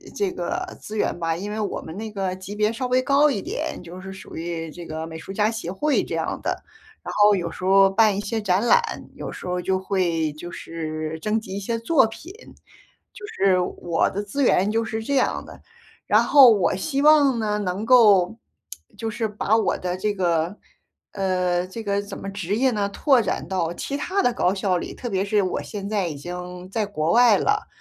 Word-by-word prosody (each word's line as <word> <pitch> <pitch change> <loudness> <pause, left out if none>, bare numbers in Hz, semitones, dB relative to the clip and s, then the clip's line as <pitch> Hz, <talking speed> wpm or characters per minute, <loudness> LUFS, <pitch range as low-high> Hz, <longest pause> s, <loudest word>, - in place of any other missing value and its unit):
这 400 -3 0
个 - - -4
资 215 - -8
源 190 - -1
吧。 165 -1 0
因 200 +5 -5
为 215 - -4
我 210 - -3
们 160 +3 -9
那 220 +1 -5
个 195 -3 -2
级 190 +2 -8
别 210 +1 +1
稍 250 +2 -3
微 255 +1 +2
高 280 +3 +4
一 235 -9 -1
点， - - -4
就 175 +2 -10
是 190 0 -8
属 190 - -10
于 165 -1 -4
这 175 +2 -9
个 160 0 -5
美 160 0 -8
术 195 - -8
家 210 +2 +2
协 225 -6 -5
会 285 +11 +1
这 - - -4
样 - - -2
的。 - - -3 0.4
然 - - -5
后 205 0 +6
有 175 -3 -3
时 185 - -7
候 195 +1 +6
办 210 +1 +3
一 - - -1
些 220 +2 -3
展 195 +2 +1
览， 480 - +5 0.3
有 - - -6
时 - - -9
候 180 0 -2
就 190 +1 0
会 175 -5 0
就 165 +4 -9
是 160 -2 -5
征 215 +4 0
集 195 -2 -6
一 - - -2
些 230 +4 -2
作 230 +2 +3
品， 295 +11 -10 0.8
就 420 - -9
是 195 - +2
我 175 -2 0
的 205 +2 -4
资 265 +8 -2
源 200 -3 +3
就 225 +1 0
是 220 0 -4
这 280 +5 -1
样 260 - +1
的。 - - -13 0.5
然 - - +4
后 275 -4 +8
我 200 -4 +2
希 275 +9 -1
望 290 -4 +6
呢， 210 -2 -1
能 200 +1 -3
够 225 -4 +5 0.6
就 225 -1 -3
是 220 +1 -2
把 210 +1 0
我 220 - +1
的 180 0 -3
这 210 +3 -1
个 175 -1 0 0.5
呃， 180 -2 0
这 225 +5 -7
个 200 -1 0
怎 200 - -8
么 - - -7
职 200 0 -2
业 260 +3 +2
呢， 205 -3 -1
拓 260 +5 +3
展 - - -3
到 175 -4 -1
其 280 - -4
他 365 +7 -2
的 245 - +2
高 180 - +1
校 190 -2 0
里， - - -7
特 245 - -6
别 195 -4 0
是 205 0 +1
我 185 - -2
现 200 -2 -6
在 205 -4 0
已 155 - -5
经 180 +4 -7
在 220 +1 0
国 165 -5 -1
外 235 -3 +6
了， 420 0 0
200 Hz, 235 characters per minute, -23 LUFS, 180-225 Hz, 0.8 s, 后